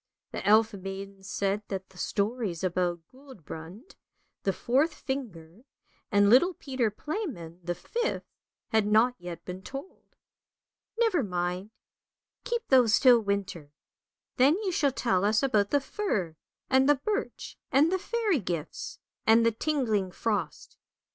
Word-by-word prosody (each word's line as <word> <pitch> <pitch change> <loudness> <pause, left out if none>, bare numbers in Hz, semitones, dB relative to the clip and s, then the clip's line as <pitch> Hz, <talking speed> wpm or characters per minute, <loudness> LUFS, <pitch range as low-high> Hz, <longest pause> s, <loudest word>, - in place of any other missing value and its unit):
" - - -64
The - - -5
elf 220 +1 +5
maiden 195 0 -7
said 195 +1 -1
that 190 -1 -5
the 190 - -19
stories 205 -4 -1
about 175 -1 0
Guldbrand, 210 - -11 0.5
the 195 - +1
fourth 275 - +1
finger, 210 - -6 0.5
and 205 -1 +5
little 295 - +5
Peter 260 -6 -1
Playman, 210 - -5
the 175 0 -2
fifth, 470 - -3 0.4
had 220 -2 +2
not 220 +4 +4
yet 175 -1 -8
been 180 +1 -6
told. 275 - -10 0.4
" 450 - -23
Never 440 -9 +3
mind, 180 -1 -2 0.7
keep 475 -2 -2
those 245 -5 +5
till 250 -3 +7
winter. 200 -7 -3 0.7
Then 275 +5 +5
you 380 - 0
shall 290 -5 +2
tell 195 -7 +1
us 210 +4 +2
about 210 -7 +2
the 285 - +3
fir, 245 - -2 0.3
and 265 +1 +4
the 290 - +6
birch, 415 +10 -4
and 295 +5 +4
the 375 - +1
fairy 420 - 0
gifts, 170 -6 -5 0.3
and 225 +1 +6
the 230 - +4
tingling 225 -7 0
frost. 180 -5 -3
220 Hz, 140 wpm, -28 LUFS, 190-275 Hz, 0.7 s, till